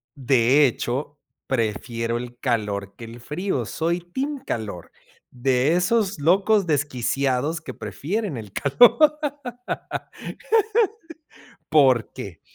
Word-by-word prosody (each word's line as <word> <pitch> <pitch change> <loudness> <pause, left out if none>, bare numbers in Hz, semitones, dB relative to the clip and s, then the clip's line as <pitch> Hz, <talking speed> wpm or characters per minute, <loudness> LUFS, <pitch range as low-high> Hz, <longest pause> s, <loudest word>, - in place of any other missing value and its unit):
De 135 +1 +4
hecho, 130 +4 -3 0.3
prefiero 115 -1 -1
el 120 0 -7
calor 105 -5 -2
que 115 - -9
el 115 +1 -10
frío, 150 - -2
soy 170 +8 -1
team 270 - -4
calor, 105 - -5 0.4
de 130 +4 +1
esos 195 +1 +1
locos 195 +5 +3
desquiciados 140 +1 0
que - - -8
prefieren 195 - -4
el 105 -4 -8
calor. 245 - +5 2.5
¿Porque? 125 - +2
135 Hz, 95 wpm, -23 LUFS, 120-175 Hz, 2.5 s, calor